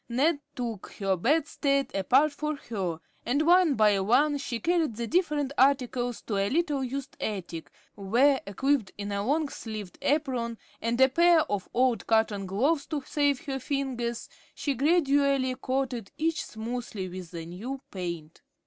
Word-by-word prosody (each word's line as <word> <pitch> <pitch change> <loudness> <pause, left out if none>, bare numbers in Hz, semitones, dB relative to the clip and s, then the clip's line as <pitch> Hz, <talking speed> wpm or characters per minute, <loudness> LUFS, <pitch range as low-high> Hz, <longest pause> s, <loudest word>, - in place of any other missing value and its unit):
Ned 285 +6 +2 0.2
took 235 -6 -5
her 195 -2 0
bedstead 275 - +1
apart 260 +10 +3
for 300 +1 -3
her, 190 - -4 0.2
and 280 +6 +1
one 345 -3 +5
by 210 -3 +4
one 275 +9 +3
she 240 -4 -3
carried 330 -7 +1
the 235 +1 -3
different 295 -3 0
articles 250 -3 +2
to 205 - -2
a 195 0 +1
little 295 -3 0
used 270 +2 -5
attic, 175 -6 -4 0.2
where, 245 +8 +3
equipped 260 +1 0
in 205 0 -4
a 200 0 -1
long 295 +6 +1
sleeved 215 -7 -7
apron 255 -6 0 0.2
and 230 +2 -1
a 265 - +8
pair 340 +4 +5
of 205 -9 -3
old 250 -1 +1
cotton 215 -3 +2
gloves 280 - +1
to 295 -3 -3
save 285 -2 +1
her 270 -2 -3
fingers, 255 -4 -3 0.3
she 285 - -1
gradually 280 -2 +2
coated 255 -4 -2
each 325 +1 0
smoothly 225 -3 -5
with 180 -1 -8
the 165 -2 -7
new 220 +11 -6
paint. 170 -4 -6
255 Hz, 155 wpm, -28 LUFS, 210-285 Hz, 0.3 s, a